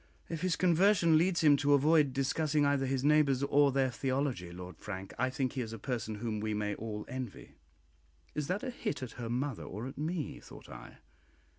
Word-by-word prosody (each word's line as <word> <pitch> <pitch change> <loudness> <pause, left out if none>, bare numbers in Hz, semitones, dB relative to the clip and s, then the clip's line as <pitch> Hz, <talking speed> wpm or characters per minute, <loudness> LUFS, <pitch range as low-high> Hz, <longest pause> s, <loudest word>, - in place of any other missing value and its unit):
"If 165 -2 -4
his 185 -2 +1
conversion 180 -1 +4
leads 170 +1 +2
him 150 -2 +7
to 145 0 +4
avoid 150 0 +4
discussing 145 +3 +1
either 140 -2 +1
his 130 0 -1
neighbours 145 -3 +3
or 140 0 +4
their 135 -1 +1
theology, 130 -8 -2
Lord 90 -1 -9
Frank, 95 -2 -7
I 130 +1 +2
think 130 -1 -2
he 130 - -2
is 115 -2 -5
a - - -5
person 110 -1 -3
whom 110 0 -3
we 110 0 -2
may 105 0 -1
all 105 -1 -5
envy." 130 -4 -7 0.8
Is 150 -2 -3
that 190 +7 -2
a 260 - -3
hit 215 - -4
at 125 - -6
her 115 - -4
mother 130 0 -2
or 105 +5 -6
at 135 +1 -8
me? 155 0 -3
thought - - -13
I. - - -11
135 Hz, 200 wpm, -32 LUFS, 115-150 Hz, 0.8 s, him